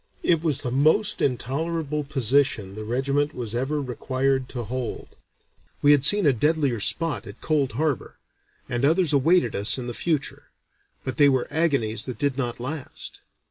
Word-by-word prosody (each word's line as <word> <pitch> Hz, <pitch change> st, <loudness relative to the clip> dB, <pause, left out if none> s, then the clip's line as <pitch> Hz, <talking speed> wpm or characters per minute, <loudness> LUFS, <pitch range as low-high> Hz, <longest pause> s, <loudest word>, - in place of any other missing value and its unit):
It 165 Hz, -3 st, +2 dB
was 155 Hz, -5 st, 0 dB
"the 125 Hz, -, -2 dB
most 155 Hz, -, +3 dB
intolerable 150 Hz, +4 st, -1 dB
position 130 Hz, -6 st, +1 dB
the 110 Hz, +1 st, -7 dB
regiment 140 Hz, +6 st, -1 dB
was 115 Hz, -3 st, -3 dB
ever 135 Hz, +5 st, -1 dB
required 130 Hz, 0 st, -1 dB
to 120 Hz, -2 st, -5 dB
hold. 125 Hz, +2 st, -5 dB, 0.7 s
We 145 Hz, -, +6 dB
had 145 Hz, -2 st, +4 dB
seen 205 Hz, +5 st, +5 dB
a 140 Hz, -, +5 dB
deadlier 140 Hz, -1 st, +1 dB
spot 145 Hz, -, +1 dB
at 100 Hz, -, -11 dB
Cold 145 Hz, -6 st, 0 dB
Harbor, 145 Hz, +1 st, -2 dB, 0.5 s
and 120 Hz, +2 st, -2 dB
others 160 Hz, +2 st, +3 dB
awaited 165 Hz, +6 st, +3 dB
us 105 Hz, +5 st, +2 dB
in 125 Hz, -, -5 dB
the 120 Hz, -, -5 dB
future; 155 Hz, +1 st, -2 dB, 0.5 s
but 130 Hz, -, -4 dB
they 145 Hz, -1 st, +6 dB
were 130 Hz, -2 st, +1 dB
agonies 135 Hz, -9 st, 0 dB
that 125 Hz, -, -6 dB
did 140 Hz, -3 st, 0 dB
not 120 Hz, -4 st, -3 dB
last. 135 Hz, +3 st, -4 dB
135 Hz, 165 wpm, -24 LUFS, 125-150 Hz, 0.7 s, We